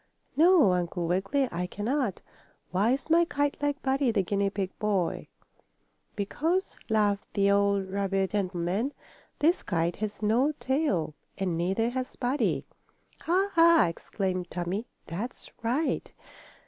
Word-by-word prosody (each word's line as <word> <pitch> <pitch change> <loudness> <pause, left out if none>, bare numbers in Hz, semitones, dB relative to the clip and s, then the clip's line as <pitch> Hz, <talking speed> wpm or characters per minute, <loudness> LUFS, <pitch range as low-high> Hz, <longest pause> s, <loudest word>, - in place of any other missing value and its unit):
"No, 320 - +6
Uncle 175 0 -1
Wiggily, 195 +11 +1
I 180 +1 -2
can 205 +3 -6
not. 255 -6 -1 0.5
Why 205 +7 +3
is 275 +4 -4
my 340 +1 +6
kite 290 -4 -1
like 290 0 -1
Buddy, 270 0 +2
the 205 -4 +1
guinea 200 +2 0
pig 195 -1 -3
boy?" 200 -5 0 0.9
"Because," 320 - -1
laughed 205 -2 +1
the 200 0 +3
old 200 -1 +2
rabbit 195 0 -1
gentleman, 195 +5 -1 0.4
"this 335 +5 +3
kite 170 0 -1
has 210 0 -4
no 245 +8 +3
tail 260 - 0 0.2
and 185 -4 -1
neither 190 +8 0
has 255 0 -4
Buddy." 260 +3 0 0.5
"Ha, 380 +4 +1
ha!" 335 0 +6
exclaimed 180 +1 -3
Tommie. 180 +6 -3 0.2
"That's 210 +9 -6
right!" 250 +8 -1
210 Hz, 135 wpm, -28 LUFS, 190-275 Hz, 0.9 s, No